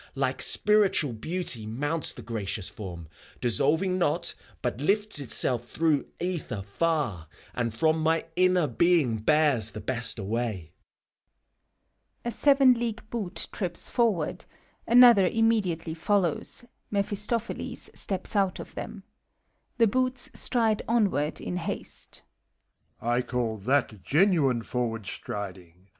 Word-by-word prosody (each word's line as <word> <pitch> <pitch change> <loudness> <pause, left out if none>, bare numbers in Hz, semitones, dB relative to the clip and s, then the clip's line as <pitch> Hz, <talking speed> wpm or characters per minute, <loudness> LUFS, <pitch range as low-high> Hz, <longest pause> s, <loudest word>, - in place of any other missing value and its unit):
Like - - -1
Spiritual 205 - +3
Beauty 130 -3 -1
mounts 145 +8 0
the 120 - -11
gracious 105 -3 -3
Form, 85 -6 -8 0.3
Dissolving 160 - +2
not, 150 -4 +2 0.3
but 130 - -2
lifts 205 +2 +1
itself 120 -2 0
through 155 -3 +1
ether 170 - -3
far, 110 - -1 0.3
And 120 -2 -1
from 155 +8 +1
my 160 +1 +1
inner 185 -1 +3
being 145 -3 +2
bears 140 -2 +2
the 110 - -8
best 120 0 +2
away. 105 -5 -3 1.5
{A - - 0
SevenAeague 245 -4 +3
hoot 205 -6 -4
trips 180 -4 -3
forward: 215 -10 0 0.4
another 235 -6 +7
tmwe 225 -1 +3
diately 165 -3 -4
follows, 185 +4 -1 0.2
Mephistopheles 210 +3 -3
steps 190 +2 -3
out 195 -2 +1
of - - -9
them. - - -7 0.7
The 230 - +5
Boots 255 +3 -1
stride 225 -4 0
onward 200 -10 +1
in 180 - -4
haste,) 170 - -6
MEPHISTOPHELES. 120 +1 -7
I - - +2
call 120 -3 -2
that 115 -2 0
genuine 145 - +2
forward 115 -4 -3
striding! 95 -2 -7
160 Hz, 120 wpm, -27 LUFS, -, 1.5 s, another